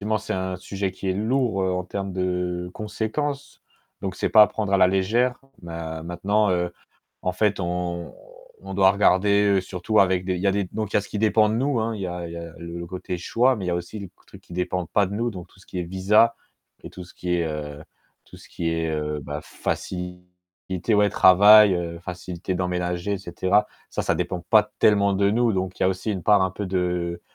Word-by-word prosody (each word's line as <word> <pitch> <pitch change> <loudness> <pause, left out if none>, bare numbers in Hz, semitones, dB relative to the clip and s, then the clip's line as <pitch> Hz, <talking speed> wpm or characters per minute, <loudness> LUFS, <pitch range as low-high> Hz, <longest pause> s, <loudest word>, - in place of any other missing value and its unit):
effectivement, 110 +1 0
c'est 110 - -5
un 95 0 -3
sujet 95 +1 -3
qui 95 - -6
est 95 - +2
lourd 115 0 0
en 90 -1 -1
termes 95 +1 -5
de 90 -1 -2
conséquences, 135 +7 -4 0.4
donc 95 -2 -4
c'est - - 0
pas 110 - +8
apprendre 105 -1 +1
à 100 - +5
la 90 -1 +5
légère, 115 +7 +1 0.2
ma 80 -1 -6
maintenant, 100 +5 0
heu, 90 -1 0 0.5
en 90 - 0
fait, 100 +1 +1
on 85 -1 -3 0.5
on - - -6
doit 95 0 +5
regarder 100 0 +3
surtout 95 +4 0
avec 95 -1 +2
des 95 -1 -1
il 90 - -5
y - - +1
a - - +3
des 100 0 0
donc 110 -2 -3
il - - -12
y - - +6
a - - +1
ce 100 - -11
qui 105 - -4
dépend 110 0 +3
de 110 - 0
nous, 130 0 0
hein. 115 +1 -1
Il 105 - -7
y - - -1
a 85 -1 -5
il 85 - -8
y - - -7
a 85 -1 -7
le 85 +1 -7
côté 90 0 -5
choix, 125 +8 +2
mais 95 -3 -5
il - - -2
y - - +1
a - - 0
aussi 85 +5 -6
le 100 - -6
q - - -33
truc - - -14
qui - - -16
ne - - -7
dépendent 90 -1 -2
pas 100 -2 +3
de 100 - -6
nous, 120 +3 -1
donc 90 -4 -9
tout 95 - -22
ce - - -20
qui 90 - -6
est 90 - -1
visa 100 +6 +3 0.5
et - - -9
tout 90 - -9
ce 90 - -17
qui 90 0 -2
est 85 - 0
heu, 75 -1 -6 0.4
tout - - -15
ce - - -16
qui 85 -1 -3
est, 80 -1 -1
heu, 75 -1 -2
bah, 75 +1 -6
facilité, 90 +2 -5
ouais 105 0 +4
travail, 100 +2 +7
heu, 85 -1 -3
facilité 90 +1 -5
d'emménager 90 +1 -2
et 100 - -1
cetera. 95 +3 +1 0.2
Ça - - -2
ça - - +1
dépend 90 -2 -2
pas 105 -1 +5
tellement 100 -2 +4
de 100 +1 +2
nous, 115 +1 +2
donc 95 -1 -3
il - - -2
y - - +5
a - - +4
aussi 95 +3 -2
une 95 - -4
part 105 -2 +5
un 95 - +1
peu 100 +2 -5
de 90 -2 -1
95 Hz, 240 wpm, -24 LUFS, 90-105 Hz, 0.5 s, pas